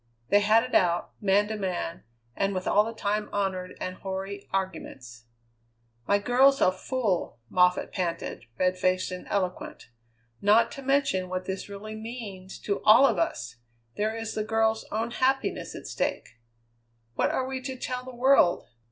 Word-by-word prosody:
They 205 - +6
had 215 +2 +4
it 255 - -7
out, 175 -1 +2
man 205 +1 +3
to 220 - -2
man, 185 -4 -3 0.3
and 195 0 0
with 185 - -3
all 210 - +5
the 225 - -4
time 210 -1 -2
honoured 190 -2 -2
and 185 0 -4
hoary 195 +1 -5
arguments. 130 -11 -5 0.8
"My 200 - +4
girl's 260 +6 +4
a 185 - +4
fool!" 200 - -2
Moffatt 180 0 +3
panted, 170 - -3
red 185 0 +1
faced 185 0 +1
and 180 0 -7
eloquent. 185 -9 -3 0.5
"Not 220 +3 +4
to 275 - -8
mention 270 -9 +1
what 185 0 -3
this 190 +2 -5
really 205 +2 -7
means 215 -5 -8
to 200 - -2
all 225 +6 +8
of 225 -9 +2
us, 120 -7 -2 0.4
there 215 +2 -1
is 225 -1 -4
the 215 - -1
girl's 220 0 +1
own 225 +2 -1
happiness 265 +2 0
at - - -9
stake. - - -2 0.8
What - - +1
are 260 - 0
we 260 0 -4
to 260 0 -5
tell 250 0 -4
the 255 - -9
world? 245 -8 +4
205 Hz, 165 wpm, -27 LUFS, 185-230 Hz, 0.8 s, all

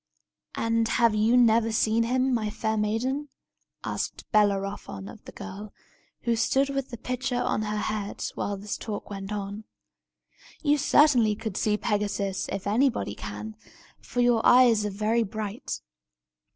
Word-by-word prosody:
"And 230 0 +1
have 230 -1 +3
you 220 +3 +3
never 225 -1 +4
seen 220 +1 +2
him, 255 +3 +1
my 220 -3 0
fair 220 +1 -2
maiden?" 245 +7 -1 0.5
asked - - -4
Bellerophon 200 - 0
of - - -12
the - - -9
girl, 205 +2 -8 0.5
who 235 -1 +1
stood 270 +5 +2
with 275 -1 -3
the 235 - -7
pitcher 250 +1 -2
on 215 - 0
her 210 0 -2
head, 210 -1 -3
while 200 0 -3
this 205 +1 -5
talk 210 -1 -6
went 195 0 -6
on. 205 +1 -4 1.0
"You 295 -1 +3
certainly 260 -7 +4
could 220 -2 -5
see 210 0 +1
Pegasus, 205 -2 -1
if 195 0 -4
anybody 240 +5 +1
can, 220 0 -7 0.4
for 245 - -2
your 240 -2 +3
eyes 235 -4 +6
are - - -2
very 215 +4 +1
bright." 215 0 -4
220 Hz, 150 wpm, -27 LUFS, 210-245 Hz, 1.0 s, eyes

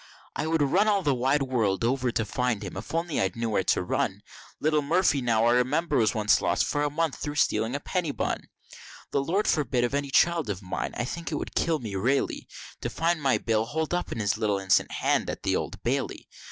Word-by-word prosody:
I 150 - -2
would 160 -2 +2
run 185 +10 +3
all 200 -2 +2
the 145 - +2
wide 135 +3 +1
world 115 -7 0
over 125 +1 +1
to 115 - -1
find 115 -1 -1
him, 95 - -6
if 95 - -7
I 165 - 0
only 165 -2 -2 0.2
know'd 115 -1 -2
where 95 - +1
to - - +2
run, 90 - -1 0.4
Little 155 0 +2
Murphy, 150 -1 +2
now 115 -2 +2
I 120 - +5
remember, 140 +7 +1
was 110 -2 +2
once 105 -1 +3
lost - - +1
for 145 - -1
a 145 - +1
month 160 0 -1
through 145 -1 -4
stealing 115 -3 +1
a - - -1
penny 180 +2 -2
bun, 140 - -3 0.6
The 140 - +1
Lord 190 +8 0
forbid 130 -5 +1
of 120 - 0
any 140 0 -1
child 165 -1 +3
of 100 -1 -4
mine! 90 - -4
I 120 - -1
think 170 +5 -5
it - - -1
would - - -5
kill 165 -1 +1
me 110 -7 -6
raily, 120 +9 0 0.3
To - - -2
find 165 -1 0
my 135 -2 +3
Bill 110 -1 0
holdin 160 +6 -1
up - - -8
his 105 -3 -1
little 105 -2 +1
innocent 95 0 +2
hand - - 0
at - - -5
the - - +1
Old - - -4
Bailey. - - -2
135 Hz, 230 wpm, -27 LUFS, 115-160 Hz, 0.6 s, I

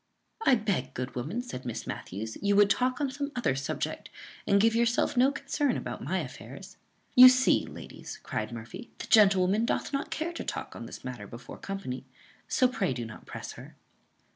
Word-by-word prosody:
"I 265 - +7
beg, 200 - -2
good 125 +1 -4
woman," 160 - -3
said 130 - -7
Miss 120 -3 -5
Matthews, 110 +4 -5
"you 205 0 +2
would 205 0 +6
talk 255 0 +1
on 280 -3 0
some 285 +1 -4
other 240 - +1
subject, 135 0 -3 0.4
and 200 - +5
give 225 +2 +4
yourself 235 +1 +2
no 255 +3 +5
concern 280 -1 -1
about - - -5
my - - 0
affairs." - - -10 0.4
"You 255 0 +11
see, 255 0 +3
ladies," - - -9
cried 110 +1 -3
Murphy, 115 - -8
"the - - -6
gentle 200 -4 +6
woman 200 +5 +2
doth 235 - -1
not 275 +1 -1
care 330 +2 -3
to - - -5
talk - - -5
on - - -7
this - - -10
matter 125 -5 -6
before 120 +3 -10
company; 195 -11 -5 0.4
so 255 - +3
pray 205 - -1
do 120 -2 -4
not 115 - -11
press - - -6
her." - - -12
205 Hz, 190 wpm, -29 LUFS, -, 0.4 s, You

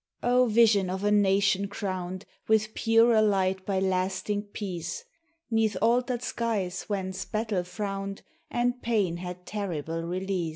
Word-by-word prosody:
O 250 +1 +4
vision 215 -4 +4
of 190 +2 -3
a 205 - +2
nation 200 -1 +3
crowned 185 -2 -4 0.2
With 220 0 +2
purer 225 0 +4
light 190 -2 +1
by 195 -2 +1
lasting 190 +2 -1
Peace, 175 -5 -5 0.5
'Neath 220 -3 +2
altered 245 +2 +1
skies 200 -8 -2
whence 190 -2 -3
Battle 215 -2 -1
frowned 195 +1 -5 0.3
And 245 +1 0
Pain 205 -7 +1
had 180 0 -7
terrible 165 -6 -3
release! 180 0 -2
200 Hz, 130 wpm, -28 LUFS, 185-220 Hz, 0.5 s, O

